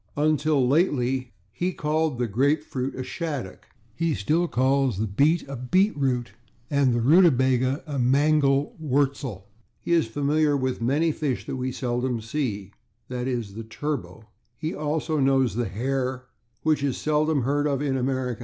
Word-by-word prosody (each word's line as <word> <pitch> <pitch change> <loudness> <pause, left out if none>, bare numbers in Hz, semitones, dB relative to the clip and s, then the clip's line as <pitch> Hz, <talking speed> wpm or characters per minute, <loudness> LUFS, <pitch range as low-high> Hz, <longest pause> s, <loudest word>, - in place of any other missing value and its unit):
Until 150 -2 +2
lately 130 -5 +1 0.2
he 180 - -2
called 155 -3 0
the 120 0 0
/grapefruit/ 135 +3 0
a 130 - -4
/shaddock/. 130 - -5 0.3
He 160 +4 0
still 165 - +1
calls 130 - +1
the 110 - 0
/beet/ 145 - +2
a 135 - -6
/beet 185 - +2
root/ 125 -5 -1 0.4
and 140 -3 +3
the - - +1
/rutabaga/ 130 -3 +4
a 145 -4 -3
/mangel 140 +2 +3
wurzel/. 135 - -1 0.3
He - - -5
is 165 -8 +3
familiar 145 +4 +1
with 130 -2 -2
many 145 +7 +2
fish 145 -4 -2
that - - -4
we 130 0 -2
seldom 125 -1 -2
see, 110 -5 -3 0.4
/e. 125 -1 -3 0.2
g./, 100 - -14
the 115 +2 -6
/turbot/. 110 -5 -5 0.3
He 155 +2 -3
also 155 +1 -1
knows 135 -4 +3
the 120 +1 -1
/hare/, 130 +5 -2 0.4
which 155 -3 +2
is 140 -3 -1
seldom 155 -2 +1
heard 145 +3 +1
of 140 -2 0
in 135 -2 0
America. 130 -2 -1
135 Hz, 155 wpm, -25 LUFS, 125-150 Hz, 0.4 s, rutabaga